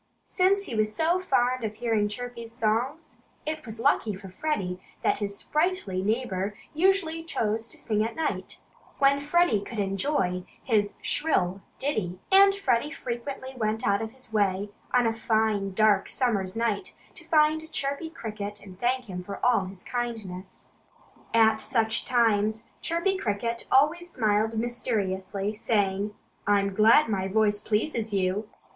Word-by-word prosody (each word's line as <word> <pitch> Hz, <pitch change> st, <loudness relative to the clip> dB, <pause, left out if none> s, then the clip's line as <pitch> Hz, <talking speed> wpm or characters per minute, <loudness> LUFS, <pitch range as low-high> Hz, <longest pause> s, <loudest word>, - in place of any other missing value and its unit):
Since 390 Hz, +2 st, +2 dB
he 305 Hz, -, -7 dB
was 215 Hz, -1 st, 0 dB
so 335 Hz, +3 st, +2 dB
fond 255 Hz, -8 st, +1 dB
of 215 Hz, -1 st, -3 dB
hearing 220 Hz, -2 st, +1 dB
Chirpy's 235 Hz, +1 st, -6 dB
songs, 240 Hz, +7 st, -1 dB, 0.3 s
it 310 Hz, 0 st, -3 dB
was 220 Hz, 0 st, -7 dB
lucky 220 Hz, -2 st, +2 dB
for 190 Hz, 0 st, -10 dB
Freddie 185 Hz, -6 st, -2 dB, 0.2 s
that -, -, +2 dB
his 200 Hz, -1 st, -2 dB
sprightly 305 Hz, -, 0 dB
neighbor 205 Hz, -2 st, -1 dB, 0.2 s
usually 330 Hz, -1 st, +2 dB
chose 225 Hz, -8 st, -1 dB
to -, -, -8 dB
sing 215 Hz, -1 st, 0 dB
at 225 Hz, -, -3 dB
night, 320 Hz, -1 st, -3 dB, 0.3 s
when 280 Hz, 0 st, +4 dB
Freddie 295 Hz, -5 st, +3 dB
could 215 Hz, +4 st, -8 dB
better 205 Hz, -, +2 dB
enjoy 195 Hz, -2 st, 0 dB, 0.2 s
his 210 Hz, -4 st, +1 dB
shrill 195 Hz, -, +1 dB, 0.2 s
ditty. 210 Hz, -11 st, -2 dB
And 395 Hz, +1 st, +8 dB
Freddie 275 Hz, -8 st, +1 dB
frequently 260 Hz, -1 st, -5 dB
went 220 Hz, -2 st, -1 dB
out 200 Hz, +2 st, +2 dB
of 220 Hz, +1 st, -5 dB
his 260 Hz, -4 st, -9 dB
way 200 Hz, -1 st, +1 dB, 0.2 s
on 250 Hz, -1 st, +4 dB
a 225 Hz, -, +2 dB
fine, 220 Hz, -3 st, +1 dB
dark, 215 Hz, -1 st, +4 dB
summer's 205 Hz, -7 st, 0 dB
night 230 Hz, -, -1 dB, 0.2 s
to -, -, -14 dB
find 315 Hz, +1 st, +2 dB
Chirpy 280 Hz, +4 st, -2 dB
Cricket 210 Hz, -7 st, -6 dB
and 185 Hz, -1 st, -12 dB
thank 250 Hz, +1 st, 0 dB
him 180 Hz, -4 st, -6 dB
for 200 Hz, +2 st, -7 dB, 0.3 s
his 190 Hz, -1 st, -9 dB
kindness. 210 Hz, -7 st, -5 dB, 0.6 s
At 220 Hz, -1 st, +5 dB
such 225 Hz, -1 st, +1 dB
times 220 Hz, -3 st, +2 dB, 0.2 s
Chirpy 340 Hz, +4 st, 0 dB
Cricket 230 Hz, -, -2 dB
always 305 Hz, +6 st, +3 dB
smiled 220 Hz, -1 st, +1 dB
mysteriously, 205 Hz, -4 st, -2 dB
saying 205 Hz, -2 st, 0 dB, 0.3 s
"I'm 200 Hz, -1 st, +3 dB
glad 220 Hz, +8 st, +6 dB
my 190 Hz, -3 st, -1 dB
voice 210 Hz, +1 st, +2 dB
pleases 220 Hz, +1 st, -1 dB
you." 195 Hz, +3 st, 0 dB
225 Hz, 150 wpm, -27 LUFS, 205-265 Hz, 0.6 s, And